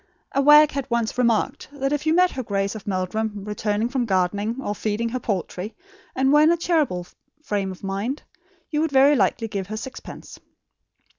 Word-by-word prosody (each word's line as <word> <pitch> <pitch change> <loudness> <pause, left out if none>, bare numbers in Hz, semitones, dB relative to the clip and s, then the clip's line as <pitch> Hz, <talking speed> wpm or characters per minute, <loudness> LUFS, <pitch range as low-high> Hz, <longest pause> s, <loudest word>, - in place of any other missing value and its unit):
A 275 - +1
wag 295 +1 +7
had 275 -2 -4
once 235 -2 0
remarked 235 -3 +1
that 275 -1 -2
if 295 +1 -2
you 315 - +4
met 360 0 +4
her 260 - -4
Grace 200 -3 -1
of 215 -2 -9
Meldrum 205 +2 -2
returning 210 +1 -1
from 250 -1 -1
gardening 200 +3 0
or 205 -6 -2
feeding 215 +2 -2
her 255 +2 -3
poultry, 200 -1 -4 0.4
and 265 +2 +2
were 295 - +6
in 310 +2 +6
a 340 - +2
charitable 305 - 0 0.4
frame 200 -7 -2
of 185 - -12
mind, 200 +8 -3 0.5
you 300 -1 +1
would 320 -2 0
very 275 +2 +5
likely 225 +1 +1
give 195 -3 -4
her 215 +1 -5
sixpence. 260 +3 -9
225 Hz, 190 wpm, -23 LUFS, 205-275 Hz, 0.5 s, wag